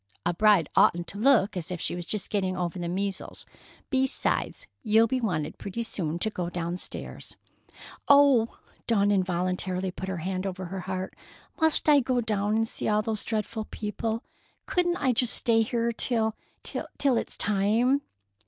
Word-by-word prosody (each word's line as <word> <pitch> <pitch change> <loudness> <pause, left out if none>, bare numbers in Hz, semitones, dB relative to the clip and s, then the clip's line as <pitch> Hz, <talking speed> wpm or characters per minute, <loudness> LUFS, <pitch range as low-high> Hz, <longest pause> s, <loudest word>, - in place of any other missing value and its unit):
A 175 - +1
bride 200 -3 +4
oughtn't 175 0 +4
to 200 - -6
look 220 -5 +4
as 175 -3 -4
if 180 -1 -4
she - - -2
was 175 -1 -6
just 210 -3 -3
getting 190 -3 0
over 180 0 -3
the 175 - -3
measles. 195 +1 -3 0.5
Besides, 265 -1 0 0.2
you'll 220 0 +4
be 255 +3 -1
wanted 160 -9 -2
pretty 230 +4 -4
soon 170 -7 -3
to 220 +5 -2
go 175 -4 -3
downstairs——" 175 0 -5 0.7
"Oh!" 280 -5 +5 0.3
Dawn 205 -3 +3
involuntarily 185 0 -1
put 190 +1 -6
her 190 - -3
hand 185 +3 -3
over 185 0 -5
her 190 +2 -5
heart. 185 0 -4 0.5
"Must 320 -1 +2
I 295 -1 +7
go 255 -1 0
down 210 -2 0
and 225 0 +1
see - - -3
all 215 0 +2
those 215 -1 -2
dreadful 220 0 -3
people? 220 +2 -4 0.4
Couldn't 350 -1 +1
I 260 -3 +1
just 240 0 +3
stay 225 -1 +3
here 235 0 0
till—till—till 235 +3 -1
it's - - -1
time?" 220 +7 +2
210 Hz, 160 wpm, -27 LUFS, 185-230 Hz, 0.7 s, I